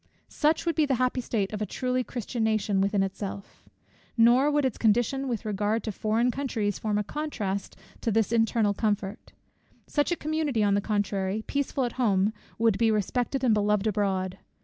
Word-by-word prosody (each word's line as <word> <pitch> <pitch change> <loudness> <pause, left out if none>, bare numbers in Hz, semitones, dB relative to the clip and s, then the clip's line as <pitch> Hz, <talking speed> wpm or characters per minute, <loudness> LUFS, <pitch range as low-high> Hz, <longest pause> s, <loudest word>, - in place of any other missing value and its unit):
Such 310 +2 +1
would 335 - +1
be 310 -2 +2
the 270 - +2
happy 255 +1 0
state 215 -4 -2
of 210 - -4
a - - +1
truly 255 0 -1
Christian 240 -1 -4
nation 215 -3 +1
within 200 0 +2
itself. 195 0 -6 0.5
Nor 240 +5 +5
would 295 -1 +2
its 260 - -2
condition 240 +5 +2
with 235 -3 -3
regard 210 +2 0
to 220 - -3
foreign 220 +4 +1
countries 230 -7 -2
form 210 -1 -1
a 210 - +1
contrast 205 -8 -4 0.3
to - - -1
this 220 0 +1
its - - 0
internal 225 -2 +2
comfort. 205 -1 -2 0.5
Such 290 +3 0
a - - +2
community, 305 -8 -1
on 200 -1 +3
the 200 - +2
contrary, 200 0 -1
peaceful 280 -1 -1
at 240 - -2
home, 205 -2 +2 0.2
would 225 -3 +2
be 230 -1 +4
respected 245 +6 0
and 240 -4 +4
beloved 210 0 +2
abroad. 190 -3 -1
220 Hz, 185 wpm, -27 LUFS, 205-255 Hz, 0.5 s, Nor